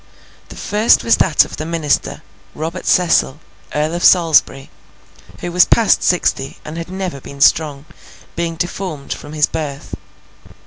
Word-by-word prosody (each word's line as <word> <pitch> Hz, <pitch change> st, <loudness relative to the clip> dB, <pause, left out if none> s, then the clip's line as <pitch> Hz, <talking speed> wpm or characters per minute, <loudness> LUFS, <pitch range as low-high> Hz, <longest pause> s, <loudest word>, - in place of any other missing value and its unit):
The -, -, -11 dB
first 210 Hz, +3 st, +2 dB
was 230 Hz, -, +3 dB
that 165 Hz, -5 st, +3 dB
of -, -, -10 dB
the -, -, -4 dB
Minister, 165 Hz, -4 st, -1 dB, 0.3 s
Robert 165 Hz, +4 st, -5 dB
Cecil, 165 Hz, -5 st, +2 dB, 0.4 s
Earl 150 Hz, +2 st, -1 dB
of 175 Hz, -, -3 dB
Salisbury, 160 Hz, -6 st, +3 dB, 0.7 s
who 175 Hz, -, -4 dB
was 180 Hz, +1 st, +5 dB
past 230 Hz, -3 st, +3 dB
sixty, 140 Hz, -6 st, 0 dB
and 155 Hz, -, -7 dB
had 165 Hz, +1 st, -6 dB
never 185 Hz, -7 st, -5 dB
been 140 Hz, +2 st, -11 dB
strong, 145 Hz, 0 st, +2 dB, 0.5 s
being 170 Hz, -1 st, -3 dB
deformed 175 Hz, -3 st, -5 dB
from 145 Hz, -, -11 dB
his 150 Hz, -1 st, +3 dB
birth. 145 Hz, -3 st, -6 dB
165 Hz, 145 wpm, -17 LUFS, 150-180 Hz, 0.7 s, was